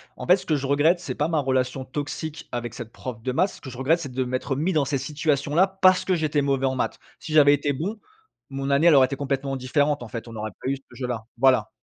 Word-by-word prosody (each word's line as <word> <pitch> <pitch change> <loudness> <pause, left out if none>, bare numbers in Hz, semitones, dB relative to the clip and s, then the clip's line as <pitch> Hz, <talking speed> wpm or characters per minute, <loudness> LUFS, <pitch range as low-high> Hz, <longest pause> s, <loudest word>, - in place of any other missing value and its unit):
En - - -7
fait 180 - +6
ce - - -12
que 155 - +2
je 140 -1 -2
regrette, 150 +6 +3
c'est 135 -7 -5
pas 150 - -1
ma 160 -1 0
relation 130 -1 -1
toxique 145 +3 -5
avec 120 -1 -4
cette 120 -3 -8
prof 120 -3 -7
de 130 - -2
maths, 180 +9 +2
ce - - -14
que 130 - -8
je 125 - -10
regrette 145 +6 +2
c'est 140 -6 -6
de 130 +1 -1
m'être 130 +2 -2
mis 165 +7 0
dans 155 -3 +3
cette 140 0 -1
situation 145 0 -1
là 185 +5 +5
parce 185 -1 +3
que 185 - +2
j'étais 155 -3 0
mauvais 135 -1 0
en 130 - +1
maths. 125 - -2 0.2
Si 155 - -7
j'avais 145 -2 +7
été 145 0 0
bon, 185 +11 -4 0.5
mon 135 0 -3
année 140 +5 +4
elle 165 - +7
aurait 135 -1 +7
été 140 - -4
complètement 135 0 -2
différente 145 +2 0
en 120 - -7
fait, 115 0 -7
on 115 - -9
n'aurait 110 -1 -5
pas 130 - -2
eu 140 - -1
ce 135 - -20
jeu 130 - -4
là, 120 -3 -3 0.2
voilà. 130 -3 +3
140 Hz, 280 wpm, -24 LUFS, 130-155 Hz, 0.5 s, j'avais